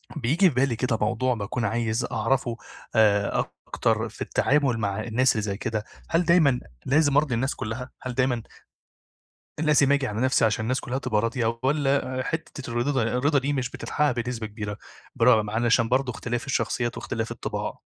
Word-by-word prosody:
بييجي 155 +7 +3
في 135 - -7
بالي 130 -1 +2
كده 115 -1 0
موضوع 125 +4 +1
باكون 115 +2 -3
عايز 115 +1 0
أعرَفه 120 +1 0 0.4
آآ 105 -2 +3 0.2
أكتر - - 0
في - - -15
التعامل 135 -4 +2
مع 100 -3 -1
الناس 125 +3 +2
اللي 110 - -1
زي 100 -2 -3
كده. 110 -1 -2 0.3
هل 170 +1 +2
دايمًا 160 -7 +4 0.3
لازم 145 0 +3
أرضِي 145 -5 +2
الناس 130 +4 -1
كلّها، 120 +4 -5
هل 130 - -4
دايمًا 125 -2 0 1.2
لازم 150 -3 +4
آجي 140 -2 +2
على 105 0 -3
نَفْسي 130 -2 +3
عشان 110 0 +1
الناس 130 +3 0
كلّها 130 +2 -3
تبقى 110 -6 0
راضية، 115 0 -1
والّا 135 -2 +1
حِتّة 155 -5 -5
الرضا 120 +5 0
ده 130 -3 +1 0.2
الرضا 145 +3 +3
دي 140 +2 -1
مش 130 -3 -2
بتتحقّق 150 -1 0
بنسبة 120 -2 -3
كبيرة، 105 -1 -6 0.4
برغم 110 -3 +4
علشان 115 +1 +2
برضه 130 +1 +1
اختلاف 120 +4 -4
الشخصيات 120 -2 -1
واختلاف 115 -1 -3
الطباع؟ - - -4
125 Hz, 170 wpm, -25 LUFS, 115-135 Hz, 1.2 s, دايمًا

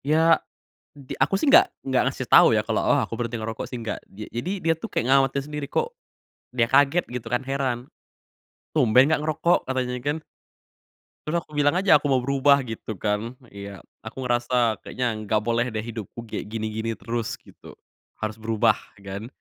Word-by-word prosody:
Ya, 160 +2 +4 0.5
di 140 -3 -13
aku 140 +8 +2
sih 275 +9 +2
nggak 365 +6 +8 0.2
nggak 130 -1 +1
ngasih 135 -1 -2
tau - - +8
ya, 105 - +2
kalo, 110 0 -1
oh - - +3
aku 115 +1 -6
berhenti 120 0 -2
ngerokok 110 0 -4
sih, - - -7
nggak. 110 -2 -3 0.2
Ja 105 +1 -7
jadi 120 +11 -3
dia 165 0 +3
tuh, 225 - -5
kek - - -1
ngawatir 135 +2 +3
sendiri. 150 0 -5
Kok 470 - -1 0.6
dia 120 -2 +1
kaget 140 +7 +3
gitu 125 -2 -6
kan, 125 - +2
heran. 130 -2 -2 0.9
"Tumben 125 -3 +5
nggak 155 0 +1
ngerokok?" 160 +3 +2
katanya 130 -1 -1
kan. 145 +3 0 1.1
Terus 155 - -3
aku 150 - -15
bilang 145 +2 +3
aja, 190 -5 +5
aku 145 - -2
mau 130 - +4
berubah, 140 +2 +3
gitu 110 -1 -6
kan. 105 +3 -2
Iya. 100 -2 -9 0.2
Aku 110 +4 -7
ngerasa 120 -1 +1
kayaknya, 125 -3 -2
nggak 110 +1 +1
boleh 120 +1 +1
deh, 110 -1 -3
hidupku 115 -1 -7
kayak 105 - -5
gini-gini 110 0 -3
terus, 115 -1 -3
gitu. - - -15 0.4
Harus 110 0 -3
berubah, 110 -1 +2 0.2
kan. 100 +2 -7
125 Hz, 180 wpm, -24 LUFS, 110-145 Hz, 1.1 s, nggak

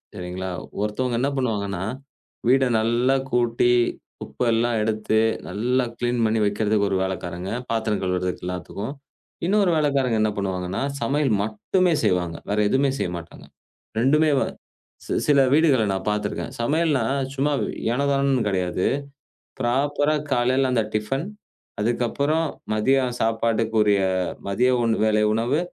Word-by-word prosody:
சரிங்களா? 90 +1 -5 0.3
ஒருத்தவங்க 115 +3 -1
என்ன 140 +1 +1
பண்ணுவாங்கன்னா, 100 -7 -1 0.7
வீட்டை 130 0 +4
நல்லா 120 +4 +2 0.2
கூட்டி, 120 0 +2 0.5
குப்பையெல்லாம் 115 -1 0
எடுத்து, 110 0 +1 0.3
நல்லா 125 +6 0
கிளீன் 120 -1 0
பண்ணி 110 0 +1
வைப்பதற்கு 105 0 +1
ஒரு 95 - +2
வேலைக்காரங்க, 90 0 -5 0.2
பாத்திரம் 110 -3 0
கழுவுறதுககு, 90 -1 -2
எல்லாத்துக்கும். 100 +7 -5 0.5
இன்னொரு 200 0 +3
வேலைக்காரங்க 140 -6 +1
என்ன 110 - +3
பண்ணுவாங்கன்னா, 95 -1 -2 0.2
சமையல் 135 +2 +1
மட்டுமே 165 - +1
செய்வாங்க. 90 -2 0
வேற 105 - 0
எதுவுமே 135 +4 +2
செய்யமாட்டாங்க. 85 -1 -5 0.5
2மே 150 +5 +4
வ - - +2 0.6
சி - - -3
சில 145 -2 +5
வீடுகளில் 135 -10 +4
நான் 95 +1 -4
பார்த்திருக்கிறேன். 105 -1 -3
சமையல்னா 150 +3 +1 0.3
சும்மா 140 +2 0 0.4
ஏனோதானோன்னு 140 -2 +1
கிடையாது. 90 -2 -1 0.7
ப்ராப்பர்ரா 145 +4 +1 0.2
காலையில 130 +1 +2
அந்த 115 -3 +2
டிபன், 135 +9 -1 0.6
அதுக்கப்புறம் 140 +8 0 0.3
மதிய 130 +6 +3 0.2
சாப்பாட்டிற்குரிய 110 -2 +2 0.5
மதிய 125 +6 +2
உண் 115 -1 +2
வேலை 110 0 +3
உணவு, 120 +7 +1
115 Hz, 115 wpm, -23 LUFS, 105-135 Hz, 0.7 s, சில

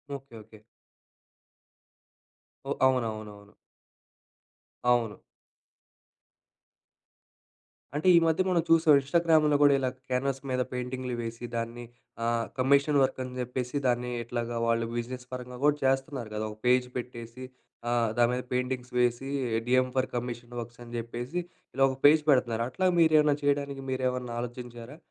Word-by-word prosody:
Okay. 135 -3 -11
Okay. 110 +1 -16 2.1
ఓహ్! - - -1
అవునవునవును. 110 -5 -3 1.3
అవును. 120 -3 +2 2.8
అంటే 155 +5 -1
ఈ - - +8
మధ్య 160 +2 +2
మనం 175 -2 +3
చూసాం 165 -2 +6
ఇన్‌స్టాగ్రామ్ 160 +2 +3 0.2
కూడా 145 -1 +7
ఇలా 130 -1 0 0.2
క్యాన్వాస్ 135 +1 -1
మీద 130 0 0
పెయింటింగ్‌లు 125 0 -4
వేసి 115 +1 -6
దాన్ని 115 +1 -4 0.4
ఆ! - - 0 0.3
కమిషన్ 140 +3 +3
వర్క్ 130 0 +1
అని 125 0 -7
చెప్పేసి 125 +1 -4
దాన్ని 125 0 0
ఎట్లాగా 120 0 -4
వాళ్ళు 115 0 +1
బిజినెస్ 125 +1 -4
పరంగా 125 -1 -7
కూడా 145 0 +5
చేస్తన్నారు 135 -2 0
కదా, 110 0 -2
ఒక 105 - -12
పేజ్ 125 0 +4
పెట్టేసి 120 0 -7 0.5
ఆ! - - 0 0.3
దాని 120 0 +4
మీద 125 0 -2
పెయింటింగ్స్ 125 0 -2
వేసి 125 +2 +1 0.4
డీఎ‌మ్ 130 0 +3
ఫర్ 130 0 +1
కమిషన్ 120 0 -5
వర్క్స్ 120 +1 -11
అని 120 - -12
చెప్పేసి 120 +8 -4 0.4
ఇలా 135 - +3
ఒక 130 - -5
పేజ్ 150 +1 +7
పెడుతున్నారు. 120 -4 +3
అట్లా 185 +9 0
మీరు 160 -1 +5
ఏమైనా 150 -1 +3
చేయడానికి 140 -1 0
మీరేమన్నా 125 -2 -2
ఆలోచించారా? 120 +2 -8
125 Hz, 130 wpm, -28 LUFS, 120-135 Hz, 2.8 s, ఈ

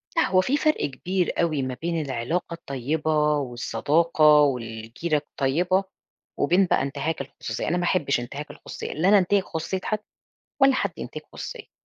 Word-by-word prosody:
لأ 330 - +3
هو 185 -1 +4
في 275 +9 +1
فرْق 310 +1 +2
كبير 180 +7 -1
أوي 155 -5 +1
ما 130 -1 -2
بين 165 -1 -1
العلاقة 145 +6 -2
الطيّبة 150 +1 0
والصداقة 150 +5 +3
والجيْرة 120 +3 -1
الطيّبة، 165 +7 0 0.6
وبين 180 +7 +4
بقى - - +2
انتهاك 140 +2 -2
الخصوصية 140 - -5
أنا 175 - +1
ما 175 - -1
أحبش 145 -8 +1
انتهاك 140 +5 -6
الخصوصية، - - -7
لا 175 +5 +2
أنا 205 - +7
أنْتهِك 195 +1 +3
خصوصية 165 +4 -3
حد 215 -1 -1 0.6
ولا 270 -1 +7
حد - - 0
ينْتهِك - - -7
خصوصيتي، - - -8
155 Hz, 155 wpm, -25 LUFS, 140-180 Hz, 0.6 s, أنا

